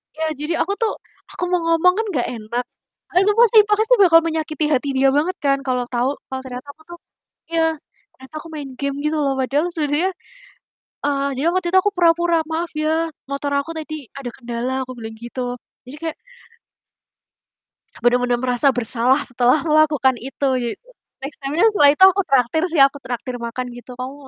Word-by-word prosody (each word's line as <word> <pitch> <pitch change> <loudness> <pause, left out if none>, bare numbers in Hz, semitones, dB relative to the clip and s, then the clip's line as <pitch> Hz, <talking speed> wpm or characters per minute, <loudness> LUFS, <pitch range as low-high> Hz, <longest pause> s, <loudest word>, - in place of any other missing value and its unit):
Iya, 320 +1 -2
jadi 300 +3 -2
aku 395 +4 -2
tuh, 445 -2 +1 0.4
aku - - -6
mau 360 - +2
ngomong 330 +2 +4
kan 450 - 0
nggak 250 -5 0
enak. 230 +2 -4 0.5
Itu 390 +3 +5
pasti 465 -2 +6
pasti 435 +3 +3
bakal 330 -3 +7
menyakiti 315 -2 -2
hati 280 0 +1
dia 270 +1 +4
banget 345 +6 0
kan, 275 -1 +3
kalau 250 -1 0
tahu 245 +1 0 0.2
kalau 265 0 -5
ternyata 255 +1 -8
aku 315 - -24
tuh 345 - -9 0.5
iya, 330 - +1 0.5
ternyata 265 +4 -15
aku 320 - -11
main 285 -3 -6
game 280 0 -2
gitu 310 +1 0
loh, 275 -1 +1
padahal 280 +5 0
sebenernya, 310 +4 0 0.9
eee, 280 -1 0
jadi 275 - -1
waktu 370 -1 -1
itu 375 - +4
aku 410 - +1
pura-pura, 340 -1 +3
"Maaf 330 +1 -2
ya, 320 +2 0 0.2
motor 280 +1 -3
aku 280 +4 -5
tadi 310 0 -5 0.2
ada 270 -3 -5
kendala," 240 0 -4
aku - - -7
bilang 220 -1 -8
gitu. 245 +1 -5 0.3
Jadi 255 +3 -10
kayak 325 -1 -4 1.9
benar-benar 245 0 +2
merasa 250 +2 +2
bersalah 245 +3 +3
setelah 250 +3 +2
melakukan 300 -4 +3
itu. 270 +2 -2
Jadi, 235 -2 -3 0.5
next 275 +2 -6
time-nya 290 +8 +1
setelah 295 -9 +5
itu 375 - +4
aku 380 +1 +5
traktir 270 +4 +2
sih, 320 -4 +3
aku 275 +1 +3
traktir 245 0 -5
makan 235 +2 -4
gitu. 245 +1 -11
"Kamu 255 +2 -5
285 Hz, 175 wpm, -20 LUFS, 255-330 Hz, 1.9 s, bakal